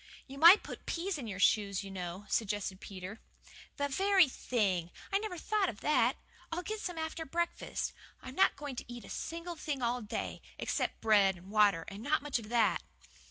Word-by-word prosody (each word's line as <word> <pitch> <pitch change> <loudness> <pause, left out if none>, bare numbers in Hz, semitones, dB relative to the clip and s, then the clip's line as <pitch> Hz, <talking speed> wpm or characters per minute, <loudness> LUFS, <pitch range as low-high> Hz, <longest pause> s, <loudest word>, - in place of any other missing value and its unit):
"You 275 +1 -10
might 345 +6 +9
put - - -9
peas 345 -1 -2
in 240 - -5
your 195 -3 -5
shoes, 200 -1 +3
you 195 - -8
know," 180 +1 -5
suggested 205 -3 -1
Peter. 190 +2 -8 0.6
"The 285 - 0
very 380 +4 +4
thing! 195 -10 0 0.2
I 395 - +3
never 420 -4 -4
thought 415 +2 +1
of 215 - -8
that. 300 - +3 0.3
I'll 345 +2 -2
get 435 +2 -4
some 355 -5 -4
after 320 0 -3
breakfast. 340 +3 -2 0.3
I'm 255 - -9
not 380 - +4
going 285 -2 -6
to 245 - -6
eat 240 -1 -8
a - - -10
single 335 +1 -5
thing 295 -5 -3
all 245 +1 0
day, 215 +1 -4 0.2
except - - -2
bread 205 -3 +5
and 185 +3 -13
water 205 -6 +4
and 200 +1 -8
not 290 +4 +1
much 290 -4 0
of 215 -2 -10
that!" 230 -2 +3
245 Hz, 195 wpm, -33 LUFS, 205-330 Hz, 0.6 s, might